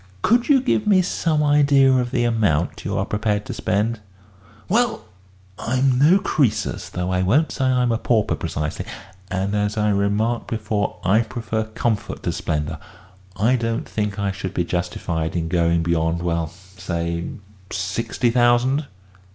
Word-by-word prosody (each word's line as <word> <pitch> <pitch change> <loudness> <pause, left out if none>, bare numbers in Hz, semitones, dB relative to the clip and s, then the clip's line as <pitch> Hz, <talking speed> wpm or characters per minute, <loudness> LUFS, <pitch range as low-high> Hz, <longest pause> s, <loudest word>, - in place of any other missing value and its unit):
"Could 240 +3 +3
you 275 -3 +5
give 220 -4 0
me 190 -3 +5
some 155 -3 0
idea 140 -2 +5
of 125 -1 +1
the 120 - 0
amount 105 -9 +1
you - - -2
are - - 0
prepared 105 -1 -1
to - - -5
spend?" 105 +4 -1 0.7
"Well, - - +1 0.5
I'm 130 +1 +1
no 160 +7 +6
Croesus 130 - 0
though 90 +1 -3
I 90 0 +1
won't 135 - +2
say 135 - -1
I'm 125 -2 +2
a 115 - 0
pauper 115 -4 +1
precisely 75 0 -4 0.4
and, 95 +2 -1
as 105 +1 0
I 105 0 +2
remarked 105 +4 0
before, 105 -2 -2
I 100 +4 +4
prefer 110 -1 -3
comfort 110 0 -2
to - - 0
splendour. 75 +1 -3 0.6
I 115 +5 +3
don't 115 +3 -2
think 105 -2 -2
I 100 -1 0
should 95 -1 -6
be 85 - 0
justified 85 -2 -2
in 85 -1 -1
going 85 -1 +2
beyond 85 0 0
well, 85 -2 0
say 85 -1 -5 0.5
sixty 110 +6 -1
thousand." 125 +4 +3
105 Hz, 155 wpm, -22 LUFS, 90-125 Hz, 0.7 s, no